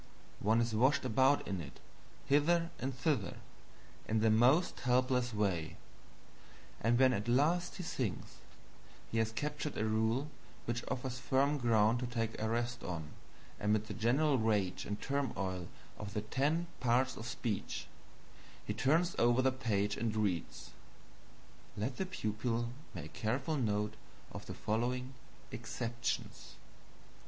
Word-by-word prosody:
One 110 +3 +3
is 115 -1 0
washed 130 +5 +3
about 130 +4 +3
in 95 -3 -2
it, 75 -2 -10 0.5
hither 165 +4 +3
and 135 - -1
thither, 125 - -1 0.7
in 110 0 +1
the 110 0 +4
most 125 +10 +4
helpless 125 0 +2
way; 95 -7 -1 1.0
and 115 +2 +3
when 130 0 +5
at 105 0 -2
last 160 +8 +2
he 180 - -5
thinks 125 - -3 0.7
he 115 - +1
has 110 0 +1
captured 150 +4 -3
a 110 - +1
rule 110 +7 +1 0.3
which 120 0 -2
offers 125 -1 -3
firm 140 +3 +2
ground 115 -1 +4
to 125 - -2
take 115 -2 -2
a 110 - 0
rest 120 +1 -1
on 80 -4 -4 0.5
amid 105 +1 +1
the - - -6
general 135 +5 +2
rage 105 -5 +1
and 105 0 -3
turmoil 100 -11 -2 0.3
of 105 0 -6
the 105 - +1
ten 145 +9 +1
parts 130 +2 +2
of 115 - -7
speech, 110 -3 -3 0.8
he - - -2
turns 165 +6 +2
over 120 +2 +4
the 130 - +4
page 105 -6 0
and 110 -1 -1
reads, 100 -6 -2 1.1
"Let 115 +6 -2
the 190 - -1
pupil 115 - -1 0.3
make 80 -3 -7
careful 130 +8 -1
note 105 -5 0 0.4
of - - -8
the - - -5
following 125 +4 -1 0.4
EXCEPTIONS." 115 +1 -4
120 Hz, 140 wpm, -34 LUFS, 110-130 Hz, 1.1 s, when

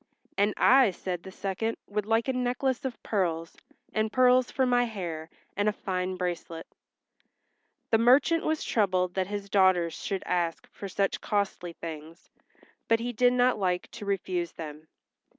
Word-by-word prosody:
"And 205 +1 +2
I," 260 -3 +6
said 180 -1 -4
the 190 - -10
second, 200 +4 -3
"would 210 0 -3
like 225 +2 +2
a 265 - +1
necklace 250 +1 -1
of 255 -3 -5
pearls, 165 -5 -1 0.4
and 215 0 0
pearls 255 0 +4
for 260 - +1
my 245 -1 +3
hair, 170 -8 -5 0.3
and 205 +1 +2
a - - +1
fine 185 -2 -3
bracelet." 175 -2 -4 1.3
The 225 - +5
merchant 265 +8 +4
was 315 0 0
troubled 185 -4 +1
that 190 -1 -1
his 205 0 -5
daughters 185 -4 +3
should 195 -1 -4
ask 170 -2 -1
for 200 - -7
such 195 +1 -1
costly 200 -4 -2
things, 160 0 -9 0.6
but 230 0 +3
he 245 +1 -3
did 245 +2 +4
not 250 -2 +3
like 180 -2 -1
to 230 -3 -8
refuse 180 -3 -2
them. 155 -1 -8
200 Hz, 160 wpm, -28 LUFS, 180-240 Hz, 1.3 s, I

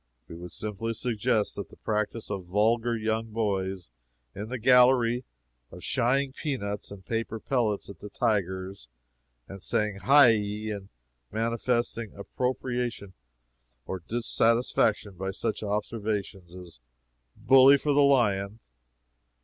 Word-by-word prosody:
We - - -9
would 85 +1 -9
simply 110 +2 -4
suggest 110 -2 0
that 100 - -5
the - - -15
practice 105 +1 -3
of 95 -3 -5
vulgar 115 +5 +1
young 110 +1 -1
boys 95 - -2 0.4
in 105 +3 -6
the 130 - -3
gallery 125 0 +4 0.4
of 90 - -12
shying 130 +2 +1
peanuts 125 -10 -4
and 100 -2 -11
paper 115 +1 -3
pellets 110 -5 -1
at 100 -5 -11
the 105 - -9
tigers, 95 - -2 0.6
and 95 -1 -10
saying 105 +1 -1
"Hi 140 +4 +6
yi!" 105 0 -1
and 100 -2 -7 0.4
manifesting 115 0 -1
approbation 120 -2 -3 0.7
or 95 - -4
dissatisfaction 115 -1 +1
by 95 +2 -3
such 105 +3 -3
observations 105 -3 -3
as 90 -8 -12 0.6
"Bully 135 +1 +7
for 145 +1 0
the 145 - +4
lion!" 105 -7 +2
110 Hz, 125 wpm, -27 LUFS, 100-120 Hz, 0.7 s, Bully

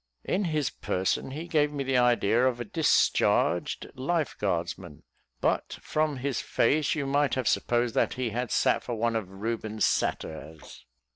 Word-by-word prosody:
In 195 +2 0
his 155 -5 0
person 95 +7 -1
he 155 +6 -6
gave 150 -3 +2
me 140 -2 -3
the 135 -1 +2
idea 120 0 +3
of 125 -2 -1
a 120 - -4
discharged 155 +8 +2
life 150 +3 -1
guardsman; 85 -6 -3 0.4
but - - 0
from 155 -2 -1
his 130 -1 -2
face 150 +6 +1
you 145 -3 -2
might 140 0 +1
have 130 -4 -1
supposed 120 -1 +1
that - - +1
he 125 -2 -2
had 120 +2 -2
sat - - +2
for 120 - -4
one 115 +1 0
of 110 -5 -2
Rubens' 110 +2 -2
Satyrs. 80 0 -3
125 Hz, 160 wpm, -28 LUFS, 110-145 Hz, 0.4 s, idea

